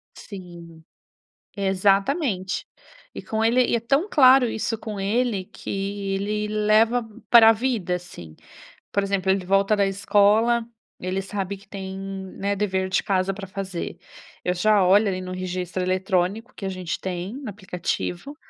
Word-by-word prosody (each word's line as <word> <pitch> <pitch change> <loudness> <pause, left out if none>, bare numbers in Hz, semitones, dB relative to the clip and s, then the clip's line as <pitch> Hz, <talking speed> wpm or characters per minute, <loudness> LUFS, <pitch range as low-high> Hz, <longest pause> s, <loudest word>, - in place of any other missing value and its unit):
Sim. 170 -4 -11 0.7
Exatamente. 195 - +1 0.5
E - - -5
com 220 0 -1
ele 245 +2 +4
e - - 0
é 235 - +1
tão 275 - +1
claro 260 - +6
isso 220 0 -2
com 210 -3 -6
ele, 210 -1 0
que - - -9 0.4
ele 210 +2 -1
leva 215 +3 +3 0.3
pra 225 -1 +9
vida, 220 -6 -1
assim. 85 - -11 0.6
Por 200 - +1
exemplo, 195 -1 +1
ele 190 -2 0
volta 195 +2 +3
da 200 -1 +2
escola, 205 +4 +3 0.3
ele 185 +2 -2
sabe 195 0 -4
que 200 - -20
tem, 190 -1 -7
né, 195 +1 -4
dever 190 -2 -1
de 190 - +1
casa 195 -1 0
para 195 -1 -8
fazer. 190 -2 -5 0.5
Eu 180 - +1
já 205 +2 +3
olho 200 +3 +5
ali 185 -1 -2
no 185 0 -6
registro 185 0 -3
eletrônico, 185 +5 -1
que 195 - -7
a - - -1
gente 185 -3 -4
tem 185 +3 -4
no 270 -5 -6
aplicativo, 185 - -4
195 Hz, 150 wpm, -24 LUFS, 185-220 Hz, 0.7 s, pra